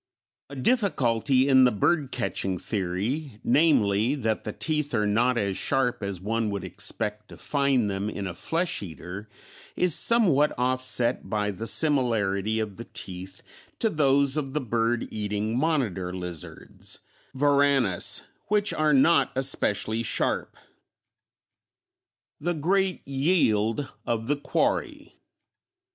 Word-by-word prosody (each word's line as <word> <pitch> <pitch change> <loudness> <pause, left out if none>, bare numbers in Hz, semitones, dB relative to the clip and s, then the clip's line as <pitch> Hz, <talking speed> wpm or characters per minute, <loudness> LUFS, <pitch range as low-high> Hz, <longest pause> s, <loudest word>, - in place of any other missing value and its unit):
A 140 - -9
difficulty 135 - +2
in 130 -2 +6
the 125 - +5
bird 135 - +1
catching 95 -6 -2
theory, 105 - -3
namely, 125 -5 +3
that 110 -6 -2
the 110 - -3
teeth 150 0 -2
are 105 -2 +1
not 120 +4 +2
as 100 -4 -1
sharp 130 -4 0
as 100 -3 -4
one 110 +3 -1
would 100 -2 -4
expect 105 +3 -2
to - - -12
find 140 -5 +1
them 100 +1 -2
in 100 -2 -5
a 90 - -4
flesh 165 - -2
eater, 95 +3 -8 0.5
is 180 -3 +3
somewhat 170 - +4
offset 125 -1 0
by 105 -1 -1
the 110 +4 -6
similarity 110 -9 +1
of 105 -3 -4
the 115 - -8
teeth 95 -1 -8 0.3
to 225 - 0
those 140 -1 +2
of 135 -3 -3
the - - +2
bird 115 -1 -1
eating 105 +1 -2
monitor 125 - 0
lizards 90 -3 -8 0.3
(Varanus), 140 -7 +2 0.2
which 210 0 +1
are 155 -1 +2
not 140 0 +4
especially 115 -4 0
sharp. 115 - -1 1.8
_The 170 0 -2
Great 190 +3 0
Yield 135 - +1 0.2
of 115 -1 -1
the 145 +5 +1
Quarry. 145 - -2
120 Hz, 125 wpm, -26 LUFS, 105-145 Hz, 1.8 s, in